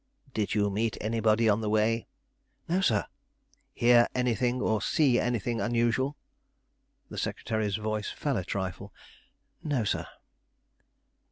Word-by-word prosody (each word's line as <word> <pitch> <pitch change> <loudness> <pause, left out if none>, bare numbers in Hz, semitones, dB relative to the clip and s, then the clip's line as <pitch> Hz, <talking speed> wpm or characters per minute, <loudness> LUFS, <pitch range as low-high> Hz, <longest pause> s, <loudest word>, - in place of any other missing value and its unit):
"Did 105 -1 -1
you 105 -1 +2
meet 110 +2 -1
anybody 110 +1 +2
on 105 +1 +3
the 105 - -1
way?" 110 +2 +1 0.6
"No, 180 +3 +1
sir." 110 - +2 0.7
"Hear 120 0 +5
any 125 -1 +2
thing 125 +2 0
or 110 -3 +1
see 135 -2 +3
anything 120 -1 -1
unusual?" 120 +4 +1 0.9
The - - -4
secretary's 110 -3 -2
voice 110 0 -2
fell 140 -5 -2
a 95 - -2
trifle. 95 +1 -4 0.7
"No, 140 -6 0
sir." 100 - -1
115 Hz, 125 wpm, -29 LUFS, 105-120 Hz, 0.9 s, Hear